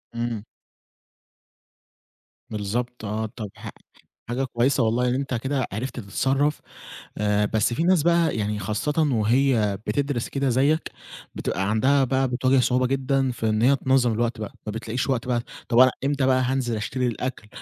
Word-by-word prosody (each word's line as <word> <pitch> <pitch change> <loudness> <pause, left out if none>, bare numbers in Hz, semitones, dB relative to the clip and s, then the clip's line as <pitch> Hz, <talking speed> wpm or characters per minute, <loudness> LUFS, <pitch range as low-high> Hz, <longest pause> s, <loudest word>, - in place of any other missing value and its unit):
إمم. 115 -3 -3 2.1
بالضبط 110 +3 -3
آه، 110 +2 -2
طَب 110 -5 -5
ح - - -8 0.6
حاجة 130 +3 -1
كويسة 125 +1 +1
والله، 120 +3 +1
إن - - +1
أنت 135 0 -2
كده 130 +2 -1
عرفت 125 +4 -4
تتصرّف. 135 +8 0 0.6
آآ 105 0 +2
بس 110 +2 +1
في 165 - 0
ناس 180 -4 +3
بَقى 170 -3 +3
يعني 105 0 -1
خاصةً 105 +9 -2 0.2
وهي 115 -2 +2
بتدرس 140 -4 -1
كده 135 -1 0
زيك، 140 +6 +1 0.4
بتبقى 95 +2 -2
عندها 135 +6 +3
بَقى 130 +1 +1
بتواجه 130 +2 +2
صعوبة 125 +1 +2
جدًا 135 0 0
في 115 -2 -2
إن 110 +1 +1
هي 135 +3 +5
تنظّم 130 -3 +2
الوقت 115 +1 -1
بَقى، 105 - -5
ما - - -1
بتلاقيش 115 +4 -3
وقت 125 -2 -1
بَقى، 120 -1 +1 0.3
طَب 120 - +4
أنا 130 0 +8
إمتى 140 -1 +1
بَقى 130 -1 +3
هانزل 125 -2 0
أشتري 125 +4 -2
الأكل، 120 -2 -4
125 Hz, 160 wpm, -24 LUFS, 110-135 Hz, 2.1 s, أنا